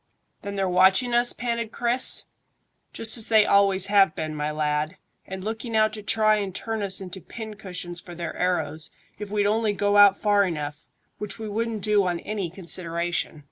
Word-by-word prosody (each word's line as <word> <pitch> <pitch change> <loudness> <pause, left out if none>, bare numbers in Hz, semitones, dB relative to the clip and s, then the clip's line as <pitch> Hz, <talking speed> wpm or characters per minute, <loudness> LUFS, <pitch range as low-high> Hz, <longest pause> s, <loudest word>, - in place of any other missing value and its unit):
"Then 200 0 -6
they're 195 -1 0
watching 190 +7 +3
us?" 240 +1 +5
panted 235 -2 -3
Chris. 240 +2 +2 0.7
"Just 225 +1 +3
as 220 - +4
they 220 -2 +5
always 195 -1 +3
have 195 -4 +3
been, 155 -1 -4
my 150 0 -3
lad, 150 +2 -2 0.3
and 190 0 -7
looking 225 +2 -5
out 215 0 +3
to 215 - -7
try 215 0 +2
and 195 -3 -4
turn 225 -1 -3
us 195 -2 0
into 190 0 -8
pin 220 +2 -8
cushions 180 -3 -7
for 175 - -11
their 170 0 -5
arrows, 160 -4 -2 0.3
if 210 -1 -6
we'd 205 0 0
only 215 0 +1
go 205 0 +1
out 200 -1 +7
far 205 -1 +3
enough, 150 -5 -5 0.3
which 210 -1 -6
we 220 -1 -6
wouldn't 220 0 -3
do 210 -3 +2
on 175 -1 -2
any 205 -5 -4
consideration." 170 -2 -2
200 Hz, 185 wpm, -24 LUFS, 175-215 Hz, 0.7 s, out